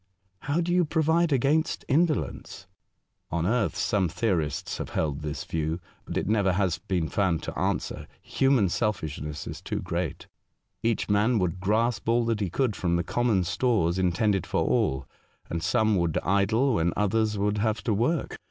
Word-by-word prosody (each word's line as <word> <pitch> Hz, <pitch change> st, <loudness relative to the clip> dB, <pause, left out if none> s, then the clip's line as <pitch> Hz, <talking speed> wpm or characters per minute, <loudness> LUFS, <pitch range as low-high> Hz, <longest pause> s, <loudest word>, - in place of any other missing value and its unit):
'' 95 Hz, 0 st, -43 dB
How 155 Hz, +4 st, +2 dB
do 175 Hz, +1 st, 0 dB
you 180 Hz, 0 st, +4 dB
provide 160 Hz, +1 st, +2 dB
against 145 Hz, +5 st, +1 dB
indolence? 150 Hz, -, 0 dB, 0.6 s
On 85 Hz, 0 st, -1 dB
earth 115 Hz, +2 st, +1 dB
some 95 Hz, -4 st, +1 dB
theorists 85 Hz, -, -1 dB
have -, -, -4 dB
held 75 Hz, -3 st, 0 dB
this 75 Hz, -1 st, -4 dB
view; 80 Hz, +1 st, -2 dB, 0.3 s
but -, -, -4 dB
it -, -, -1 dB
never 100 Hz, -3 st, +2 dB
has 90 Hz, -3 st, 0 dB
been 90 Hz, -4 st, -1 dB
found 90 Hz, -5 st, 0 dB
to -, -, -5 dB
answer -, -, -2 dB
— -, -, -40 dB, 0.2 s
human 135 Hz, -7 st, +4 dB
selfishness 75 Hz, -, -2 dB
is -, -, -7 dB
too -, -, -3 dB
great -, -, -3 dB, 0.3 s
— -, -, -52 dB
each 115 Hz, -1 st, 0 dB
man 105 Hz, +4 st, +3 dB
would 90 Hz, -2 st, -1 dB
grasp 110 Hz, +3 st, 0 dB
all 120 Hz, 0 st, +3 dB
that 115 Hz, -2 st, 0 dB
he 100 Hz, -4 st, -1 dB
could 120 Hz, +3 st, 0 dB
from 85 Hz, -2 st, 0 dB
the 85 Hz, -, +1 dB
common 115 Hz, -1 st, +1 dB
stores 95 Hz, -3 st, +1 dB
intended 95 Hz, +1 st, +1 dB
for -, -, 0 dB
all, 65 Hz, 0 st, +1 dB, 0.5 s
and 85 Hz, -, -2 dB
some 110 Hz, +3 st, +2 dB
would 85 Hz, -3 st, 0 dB
idle 110 Hz, +8 st, +2 dB
when 85 Hz, -4 st, +1 dB
others 105 Hz, +1 st, +1 dB
would 105 Hz, +1 st, 0 dB
have 110 Hz, 0 st, 0 dB
to 115 Hz, -, +1 dB
work." 130 Hz, +9 st, -1 dB
105 Hz, 180 wpm, -27 LUFS, 85-120 Hz, 0.6 s, you